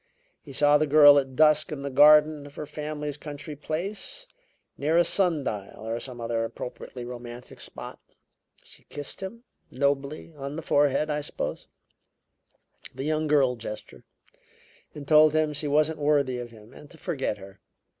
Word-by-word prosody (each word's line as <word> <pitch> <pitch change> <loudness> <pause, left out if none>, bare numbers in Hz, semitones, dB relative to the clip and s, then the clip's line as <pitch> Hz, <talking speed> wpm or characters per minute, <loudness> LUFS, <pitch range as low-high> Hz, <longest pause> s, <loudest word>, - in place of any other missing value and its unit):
He 145 - -12
saw 145 +2 +4
the 155 - +1
girl 145 -1 +8
at 135 -1 -5
dusk 155 +1 +4
in 140 -2 -5
the 140 - -4
garden 150 +1 +6
of 140 - -15
her 150 - -5
family's 150 -1 -5
country 150 0 -8
place; 195 - -5 0.5
near 155 +4 +1
a 175 - +6
sun 175 -6 +1
dial, 105 -1 -6
or 115 +1 -2
some 125 -2 -8
other 115 -1 -1
appropriately 125 +1 -7
romantic 120 0 -9
spot. - - -8 0.6
She - - -14
kissed 145 +4 -7
him 230 +5 -7 0.3
nobly 140 +4 -2
on 140 0 -6
the 165 - -6
forehead, 145 +1 +2
I 150 0 -1
suppose - - -5 1.3
the - - -5
young 155 +1 0
girl 140 -4 +3
gesture; 110 -2 -9 0.9
and 145 -2 -9
told 155 0 +6
him 155 -1 +1
she 150 +1 -3
wasn't 155 +2 +2
worthy 145 -4 +1
of 120 -1 -6
him 110 -1 -16
and 150 - -14
to 165 - -15
forget 145 - -3
her. 95 0 -13
145 Hz, 165 wpm, -26 LUFS, 130-155 Hz, 1.3 s, girl